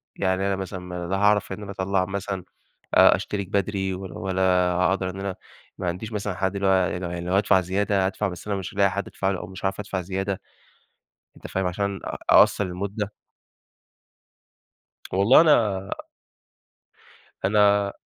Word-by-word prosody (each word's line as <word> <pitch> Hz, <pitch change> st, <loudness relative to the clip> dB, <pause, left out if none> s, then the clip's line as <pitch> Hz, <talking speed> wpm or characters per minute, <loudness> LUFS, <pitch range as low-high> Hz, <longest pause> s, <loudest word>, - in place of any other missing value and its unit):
يعني 95 Hz, 0 st, 0 dB
أنا 100 Hz, -, +1 dB
مثلًا 90 Hz, -2 st, -6 dB
لا 95 Hz, -, 0 dB
هاعرف 105 Hz, 0 st, +3 dB
إن 95 Hz, -, -5 dB
أنا 100 Hz, -, -7 dB
أطلع 95 Hz, -1 st, 0 dB
مثلًا 95 Hz, -1 st, -4 dB, 0.5 s
آآ، -, -, +7 dB
أشترك 100 Hz, -3 st, -4 dB
بدري، 95 Hz, -1 st, -1 dB
ولا 95 Hz, -2 st, -7 dB
ولا 95 Hz, -1 st, -2 dB, 0.3 s
هاقدر 95 Hz, +1 st, +1 dB
إن 95 Hz, +1 st, -7 dB
أنا 100 Hz, -1 st, -3 dB, 0.4 s
ما 90 Hz, -, -2 dB
عنديش 95 Hz, +6 st, -4 dB
مثلًا 105 Hz, -2 st, -3 dB
حد، 95 Hz, +1 st, -1 dB
اللي 100 Hz, 0 st, 0 dB
هو -, -, +4 dB
يعني 90 Hz, -1 st, +2 dB
لو 90 Hz, -1 st, -4 dB
يعني 85 Hz, 0 st, -5 dB
لو 90 Hz, -, -2 dB
هادفع 100 Hz, -1 st, +4 dB
زيادة، 95 Hz, +1 st, 0 dB
أدفع، 100 Hz, +2 st, -1 dB
بس 90 Hz, +1 st, -8 dB
أنا 100 Hz, -, 0 dB
مش 95 Hz, -3 st, -6 dB
هالاقي 100 Hz, -1 st, +3 dB
حد 100 Hz, +2 st, -3 dB
أدفع 95 Hz, -, -1 dB
له، 95 Hz, -, -2 dB
أو -, -, -6 dB
مش 95 Hz, +1 st, -10 dB
هاعرف 95 Hz, +1 st, -1 dB
أدفع 95 Hz, -2 st, -3 dB
زيادة، 95 Hz, +1 st, -3 dB, 1.0 s
أنت -, -, -10 dB
فاهم؟ 95 Hz, 0 st, -2 dB
عشان 100 Hz, +2 st, -2 dB
أ -, -, -4 dB
أقصّر -, -, +6 dB
المدة. 100 Hz, +3 st, -4 dB, 2.0 s
والله 100 Hz, +9 st, +6 dB
أنا 105 Hz, -, +3 dB, 1.5 s
أنا 100 Hz, 0 st, +3 dB
95 Hz, 170 wpm, -24 LUFS, 95-100 Hz, 2.0 s, آآ